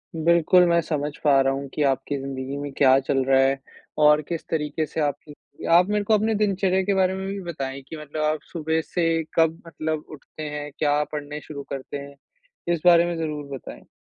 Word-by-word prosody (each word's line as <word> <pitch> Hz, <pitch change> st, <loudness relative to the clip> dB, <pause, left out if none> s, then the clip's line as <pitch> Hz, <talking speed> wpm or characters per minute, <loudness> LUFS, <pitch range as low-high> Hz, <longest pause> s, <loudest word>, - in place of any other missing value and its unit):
बिल्कुल, 170 Hz, +2 st, +4 dB
मैं 170 Hz, -1 st, +3 dB
समझ 150 Hz, -2 st, -2 dB
पा 140 Hz, -2 st, +5 dB
रहा 135 Hz, 0 st, +2 dB
हूँ 140 Hz, +1 st, -4 dB
कि 150 Hz, -, -2 dB
आपकी 140 Hz, +1 st, 0 dB
ज़िंदगी 135 Hz, 0 st, -5 dB
में 145 Hz, 0 st, -5 dB
क्या 135 Hz, -1 st, +5 dB
चल 135 Hz, 0 st, 0 dB
रहा 135 Hz, 0 st, +4 dB
है 135 Hz, +1 st, +2 dB, 0.4 s
और 150 Hz, 0 st, +6 dB
किस 170 Hz, -2 st, -4 dB
तरीके 155 Hz, 0 st, -1 dB
से 160 Hz, -, -6 dB
आपकी 145 Hz, 0 st, -5 dB
आप 180 Hz, +2 st, +6 dB
मेरे 210 Hz, 0 st, +1 dB
को 220 Hz, -, +1 dB
अपने 215 Hz, +1 st, +2 dB
दिनचर्या 195 Hz, -2 st, +1 dB
के 200 Hz, +1 st, +1 dB
बारे 190 Hz, -1 st, +2 dB
में 190 Hz, 0 st, -4 dB
भी 200 Hz, +1 st, -4 dB
बताएँ 135 Hz, -3 st, -5 dB
कि 160 Hz, -, -7 dB
मतलब 150 Hz, 0 st, -6 dB
आप 155 Hz, -1 st, 0 dB
सुबह 160 Hz, -1 st, -1 dB
से 165 Hz, -1 st, 0 dB
कब 165 Hz, 0 st, +2 dB
मतलब 155 Hz, 0 st, -3 dB
उठते 155 Hz, +1 st, -10 dB
हैं? 150 Hz, 0 st, -5 dB
क्या 150 Hz, -1 st, +2 dB
पढ़ने 150 Hz, 0 st, -5 dB
शुरू 140 Hz, -2 st, -8 dB
करते 135 Hz, +1 st, -5 dB
हैं? 140 Hz, 0 st, -10 dB, 0.6 s
इस 160 Hz, -, -2 dB
बारे 170 Hz, -1 st, +7 dB
में 175 Hz, -, -2 dB
ज़रूर 150 Hz, -2 st, -3 dB
बताएँ। -, -, -11 dB
155 Hz, 205 wpm, -24 LUFS, 140-170 Hz, 0.6 s, बारे